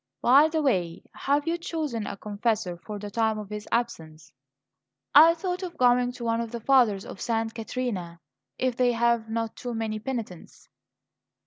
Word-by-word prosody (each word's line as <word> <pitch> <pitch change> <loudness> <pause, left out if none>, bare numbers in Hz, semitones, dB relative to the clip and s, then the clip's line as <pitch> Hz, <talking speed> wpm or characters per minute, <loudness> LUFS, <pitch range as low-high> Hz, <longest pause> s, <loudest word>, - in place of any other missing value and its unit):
By 275 +5 +6
the 315 -1 -1
way, 180 -11 0
have 290 +2 0
you 340 +1 0
chosen 300 - -3
a - - -5
confessor 210 -3 -2
for 205 +4 -8
the 205 0 -7
time 220 0 +1
of 210 -1 -7
his 210 0 -6
absence?" 165 -10 -3 0.8
"I 325 +3 +8
thought 360 +1 -3
of 360 -2 -6
going 245 0 +3
to 245 - -9
one 230 0 0
of 230 - -4
the 235 - -4
fathers 230 -5 +3
of - - -9
Santa 225 -1 -1
Caterina, 220 -8 -4 0.4
if 255 -2 0
they 245 -1 +2
have 235 -1 +1
not 225 0 -3
too 245 -1 -5
many 220 -1 -2
penitents." 220 -7 -7
230 Hz, 175 wpm, -26 LUFS, 210-255 Hz, 0.8 s, I